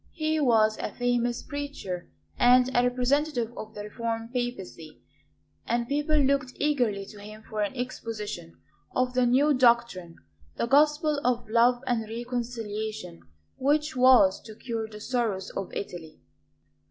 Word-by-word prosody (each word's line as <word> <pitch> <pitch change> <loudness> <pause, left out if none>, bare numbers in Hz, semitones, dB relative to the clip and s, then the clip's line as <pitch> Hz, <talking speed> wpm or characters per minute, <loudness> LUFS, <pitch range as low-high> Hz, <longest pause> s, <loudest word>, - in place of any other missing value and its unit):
He 315 -1 0
was 220 -6 +3
a - - -3
famous 245 -1 0
preacher 280 -12 -6 0.3
and 250 +1 +4
a 245 - +5
representative 245 0 0
of 220 0 -8
the 205 - -6
reformed 230 +2 -4
Papacy; 195 -10 -5 0.7
and 235 0 0
people 295 +3 +1
looked 275 -2 +1
eagerly 245 -10 0
to 205 +1 -12
him 215 +1 -11
for 215 -1 -3
an 205 +5 -2
exposition 215 - -6 0.4
of 250 0 +1
the 250 -1 +3
"new 280 +5 +4
doctrine," 235 -9 +2 0.4
the - - -1
gospel 295 +2 +3
of 240 -1 0
love 240 +3 +3
and 230 -4 -1
reconciliation 225 - -5 0.4
which 300 +3 +1
was 250 -7 +5
to 220 -1 -11
cure 230 -1 -4
the 210 -1 -11
sorrows 215 -5 -2
of 195 - -5
Italy. 165 -5 -7
240 Hz, 140 wpm, -27 LUFS, 215-255 Hz, 0.7 s, a